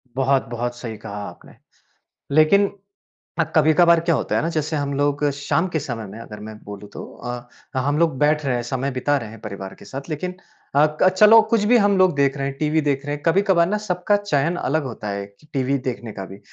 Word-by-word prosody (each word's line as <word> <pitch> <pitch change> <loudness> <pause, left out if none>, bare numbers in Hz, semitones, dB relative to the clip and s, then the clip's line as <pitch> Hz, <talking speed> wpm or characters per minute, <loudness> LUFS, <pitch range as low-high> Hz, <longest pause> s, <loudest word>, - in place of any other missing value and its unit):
बहुत-बहुत 120 -3 0
सही 115 -3 -6
कहा 105 -2 -7
आपने। - - -16 0.8
लेकिन 195 +7 +5 0.7
अ, - - +4
कभी-कभार 165 +2 +5
क्या 170 0 +1
होता 115 -5 -1
है - - +1
ना 165 - 0
जैसे 155 +1 -1
हम 140 -1 -2
लोग 145 +1 0
शाम 145 +5 0
के 165 - -1
समय 120 -6 -5
में 100 +3 -10
अगर 105 -2 -9
मैं 110 - -9
बोलूँ 105 0 -9
तो - - -7
अ, 120 0 -6 0.3
हम 145 +3 +1
लोग 165 -4 +2
बैठ 150 +1 +2
रहे 130 - +1
हैं 120 - -2
समय 130 +3 -2
बिता 130 +3 +1
रहे 115 - -7
हैं 115 -1 -12
परिवार 100 -3 -7
के - - -12
साथ 135 +3 -8
लेकिन 180 +4 -3 0.4
अ, 150 +4 +4
चलो 210 +4 +7
कुछ 225 -3 +3
भी - - +8
हम 205 -2 +3
लोग 185 -3 +4
देख 140 0 +2
रहे 135 - -1
हैं 135 - -6
टीवी 155 +1 +1
देख 140 -2 -1
रहे 145 - -1
हैं, 145 - -8
कभी-कभार 185 0 +4
ना 210 - 0
सबका 205 0 0
चयन 175 -5 0
अलग 155 -2 -1
होता 115 -5 -6
है 100 0 -3 0.3
टीवी 135 0 0
देखने 120 -3 -4
का 95 - -6
भी। 95 +1 -11
145 Hz, 220 wpm, -22 LUFS, 120-165 Hz, 0.8 s, भी